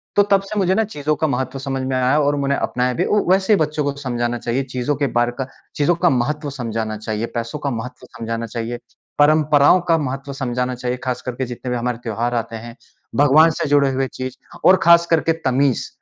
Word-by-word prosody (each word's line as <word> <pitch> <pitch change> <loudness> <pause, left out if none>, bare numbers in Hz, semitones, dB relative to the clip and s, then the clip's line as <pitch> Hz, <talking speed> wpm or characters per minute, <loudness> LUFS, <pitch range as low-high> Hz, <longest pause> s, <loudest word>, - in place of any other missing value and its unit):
तो 205 - +6
तब 195 -1 +5
से 210 +2 -6
मुझे 190 -1 +2
ना 220 - +3
चीज़ों 155 -8 -2
का 155 - 0
महत्व 130 0 -2
समझ 135 0 -3
में 130 - -1
आया 130 +4 +2
और 145 0 +2
मैंने 140 0 0
अपनाया 125 -1 -1
भी - - 0
वू 210 - +3
वैसे 190 +2 +3
ही - - +5
बच्चों 150 -1 0
को 145 - 0
समझाना 120 -2 -2
चाहिए, 120 +4 -1
चीज़ों 130 +2 -2
के 140 +1 0
बारे 120 0 +2
का 135 - -2 0.3
चीज़ों 160 +4 +2
का 175 +1 +2
महत्व 145 +3 -1
समझाना 115 -4 -3
चाहिए, 110 +1 -3
पैसों 115 +5 -3
का 140 - -2
महत्व 125 +2 -7
समझाना 115 0 -3
चाहिए, 115 +2 -4 0.4
परंपराओं 150 +2 +5
का 165 - +5
महत्व 135 -1 -4
समझाना 125 -1 -2
चाहिए, 125 0 -3
खास 125 -1 -2
करके 125 +1 -2
जितने 125 +1 -6
भी 125 - 0
हमारे 120 0 -2
त्योहार 120 +2 -2
आते 115 -1 -3
हैं, 115 +1 -9 0.4
भगवान 145 +3 +6
से - - 0
जुड़े 140 -1 +4
हुए 135 0 -1
चीज़ 130 0 -6 0.3
और 185 - +7
खासकर 170 -1 +5
के - - +5
तमीज़, 130 0 +1
130 Hz, 215 wpm, -20 LUFS, 120-150 Hz, 0.4 s, और